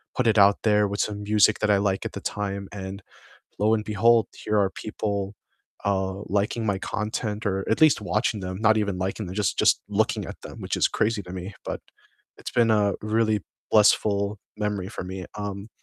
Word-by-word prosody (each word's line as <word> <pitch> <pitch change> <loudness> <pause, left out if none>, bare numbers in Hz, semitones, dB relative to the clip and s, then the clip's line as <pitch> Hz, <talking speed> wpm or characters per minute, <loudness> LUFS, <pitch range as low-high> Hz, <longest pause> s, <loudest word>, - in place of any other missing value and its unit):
put 125 -2 +1
it 110 - +3
out 100 0 +6
there 105 -1 +4
with 100 +1 -4
some 105 -1 -3
music 105 0 +4
that 105 -1 +2
I 100 - +5
like 100 -1 0
at - - -3
the - - -6
time, 100 -1 -3
and 100 0 -6 0.6
lo 110 +2 +3
and 105 - -2
behold, 115 +2 +4 0.2
here 105 - +1
are 95 -1 +2
people, 100 -2 -3 0.5
uh, 95 -1 0
liking 105 +3 0
my 100 -2 +1
content 110 0 -3
or 95 -1 0
at - - +2
least 155 -8 +6
watching 105 +1 0
them, 95 0 -4
not 110 0 +5
even 100 -3 0
liking 95 +2 -3
them, 95 - -7
just 105 -2 0
just - - +4
looking - - 0
at - - -9
them, - - -10
which - - -2
is - - +4
crazy 110 -1 0
to 90 - -10
me. 95 +2 -6
But - - -3 0.6
it's - - -7
been 115 -2 +3
a 105 -2 +3
really 110 -1 +1 0.3
blissful 100 -1 +3 0.2
memory 105 -3 -2
for 105 - -6
me. 95 0 -6
Um, 100 +1 -5
105 Hz, 200 wpm, -25 LUFS, 100-110 Hz, 0.6 s, out